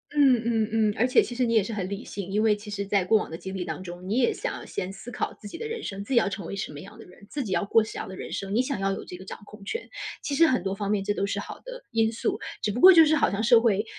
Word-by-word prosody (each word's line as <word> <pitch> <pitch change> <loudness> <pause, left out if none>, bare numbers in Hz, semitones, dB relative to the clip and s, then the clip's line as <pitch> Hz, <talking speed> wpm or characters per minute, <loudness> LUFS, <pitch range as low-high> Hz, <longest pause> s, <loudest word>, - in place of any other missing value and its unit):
嗯 265 -5 +5
嗯 225 -2 +1
嗯， 215 -2 +2
而 235 - +3
且 255 - +5
其 240 - -5
实 250 0 +2
你 230 - 0
也 220 - +5
是 220 +4 -5
很 190 -2 -3
理 200 +3 -5
性， 195 -2 -6
因 210 +2 +1
为 215 -2 +4
其 210 0 -10
实 200 -1 -3
在 200 -1 +2
过 220 +4 +4
往 - - -3
的 165 - -6
经 190 +2 -7
历 185 -2 -3
当 185 - -5
中， 175 +1 -8
你 220 +5 0
也 240 - +3
想 - - -5
先 185 +1 -4
思 220 +5 -9
考 - - -3
自 205 - -11
己 - - -8
的 455 - -5
人 455 -1 -5
生， 195 0 -5
自 270 - -3
己 - - +2
要 195 - +1
成 190 -3 -6
为 200 - -5
什 195 - -4
么 145 - -9
样 200 +5 -12
的 225 - -11
人， 195 +3 -17
自 285 -3 -3
己 200 - -6
要 200 - +1
过 220 +2 +4
什 220 - -8
么 - - -3
样 - - -7
的 190 - -8
人 - - -7
生， 195 +1 -3
你 245 - +4
想 255 -4 -3
要 195 0 0
有 - - -5
这 180 - -9
个 190 - -11
掌 - - -7
控 210 -1 -13
权。 460 - -4 0.3
其 285 - -2
实 330 +3 +5
很 250 -9 +1
多 195 0 -1
方 200 0 -3
面 205 -2 +1
这 205 - 0
都 200 - -1
是 200 - -2
好 - - -9
的 - - -8
因 225 -1 +3
素， 230 - -2 0.2
只 210 - 0
不 240 - -3
过 375 0 +10
就 325 -2 +8
是 310 0 +3
好 - - +3
像 205 +3 -2
社 235 0 +7
会， 220 -2 +2
210 Hz, 375 characters per minute, -26 LUFS, 195-240 Hz, 0.3 s, 过